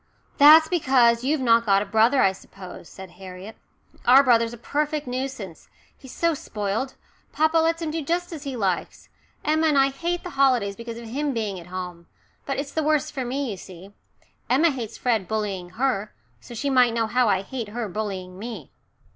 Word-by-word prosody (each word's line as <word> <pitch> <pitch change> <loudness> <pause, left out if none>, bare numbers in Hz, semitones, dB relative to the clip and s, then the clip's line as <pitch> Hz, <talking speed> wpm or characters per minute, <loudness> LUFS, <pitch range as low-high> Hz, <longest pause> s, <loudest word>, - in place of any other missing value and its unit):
"That's 310 +3 +9
because 255 -8 +3
you've 285 +2 0
not 230 -2 +4
got 200 -2 +3
a - - -9
brother, 225 +6 +3
I 195 - +4
suppose," 190 -2 -12
said 190 -2 -11
Harriet. 190 +3 -9 0.5
"Our 265 +3 +7
brother's 230 -3 +3
a 240 - -9
perfect 300 +5 -2
nuisance. 250 -8 -6 0.3
He's 265 - -13
so 335 +3 +1
spoilt 220 0 -4 0.4
papa 315 +1 +3
lets 330 +1 +1
him 315 - -2
do 325 +1 -3
just 345 +4 -2
as 310 - -7
he 275 -2 -5
likes. 190 -6 -3 0.4
Emma 315 +1 +2
and 300 -2 +2
I 270 0 +4
hate 340 +5 -3
the 360 - -7
holidays 255 -8 +2
because 230 0 -8
of 235 - -9
him 280 +3 -2
being 210 -5 -3
at 170 - -13
home. 180 -2 -7 0.4
But 275 - -2
it's 280 0 -4
the 315 - -1
worst 305 0 0
for 265 -3 -3
me, 260 0 -3
you 195 - -6
see. 185 +2 -12 0.6
Emma 305 +6 +4
hates 235 -5 -6
Fred 225 -7 0
bullying 200 -4 -3
her, 235 -5 -1 0.2
so 240 - -11
she 280 +5 -2
might 250 -3 +4
know 230 -1 +1
I 220 -5 +1
hate 235 +1 -5
her 230 +1 -4
bullying 190 -2 -5
me." 215 - -8
240 Hz, 190 wpm, -24 LUFS, 205-280 Hz, 0.6 s, That's